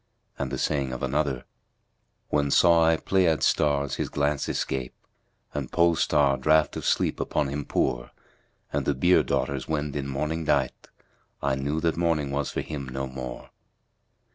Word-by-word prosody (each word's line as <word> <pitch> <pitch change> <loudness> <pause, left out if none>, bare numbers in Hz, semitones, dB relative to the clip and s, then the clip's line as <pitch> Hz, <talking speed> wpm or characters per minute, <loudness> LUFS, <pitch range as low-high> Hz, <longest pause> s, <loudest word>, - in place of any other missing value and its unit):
'" - - -34
And 70 -3 -2
the 65 - -2
saying 70 -2 -1
of 65 - -5
another, 70 -2 -1 0.8
"When 70 -1 +1
saw 85 +2 +5
I 80 0 +4
Pleiad 85 -6 +2
stars 70 -1 +1
his - - -2
glance 70 0 0
escape 65 -2 -3 0.3
* - - -42
And 70 -4 -4
Pole 85 -1 +3
star 70 -3 +2
draught 80 +1 +3
of - - -3
sleep - - +1
upon 75 -2 -1
him 70 +1 -4
pour; - - -1 0.6
And - - -1
the 70 - +2
Bier 90 +8 +4
daughters[FN#236] 70 -2 -1
wend 75 -2 -2
in 70 -1 -2
mourning 75 +4 -2
dight, 70 -4 0 0.3
* - - -41
I - - +1
knew 70 +4 -1
that 85 -1 0
morning 80 -5 0
was 70 0 -1
for - - -2
him 70 -4 -6
no 65 +1 -3
more!" 65 -2 -7
70 Hz, 175 wpm, -26 LUFS, 65-80 Hz, 0.8 s, saw